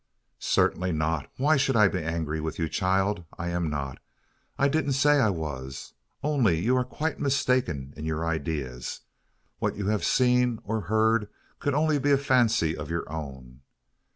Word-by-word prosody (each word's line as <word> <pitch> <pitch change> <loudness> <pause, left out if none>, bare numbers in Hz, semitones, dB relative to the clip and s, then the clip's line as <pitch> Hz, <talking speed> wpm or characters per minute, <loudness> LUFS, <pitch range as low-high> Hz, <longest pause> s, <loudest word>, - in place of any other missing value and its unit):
"Certainly 90 0 +1
not. 80 -1 -1
Why 150 +3 +3
should 135 -1 +1
I 105 -3 +6
be 95 -2 -2
angry 80 -1 -2
with 80 0 -4
you, 80 - 0
child? 95 +2 0
I'm 85 -1 -2
not. 70 -3 -4 0.6
I 140 - +3
didn't 145 -1 +1
say 145 +2 +4
I 115 -6 +4
was; 70 -7 -5 0.3
only 130 - +2
you 120 +9 +2
are 125 - +2
quite 155 +4 -3
mistaken 125 - 0
in 75 - -6
your 80 +1 -2
ideas. 70 -6 -3 0.6
What - - -1
you've 105 +1 -1
seen, 125 -2 +3
or 110 +1 -2
heard, 110 +1 +2 0.3
could 145 -2 0
be - - +1
only 155 -1 +3
a 140 - +6
fancy 120 - +2
of 75 -1 -7
your 85 0 -2
own. 65 -5 -7
95 Hz, 160 wpm, -27 LUFS, 80-125 Hz, 0.6 s, I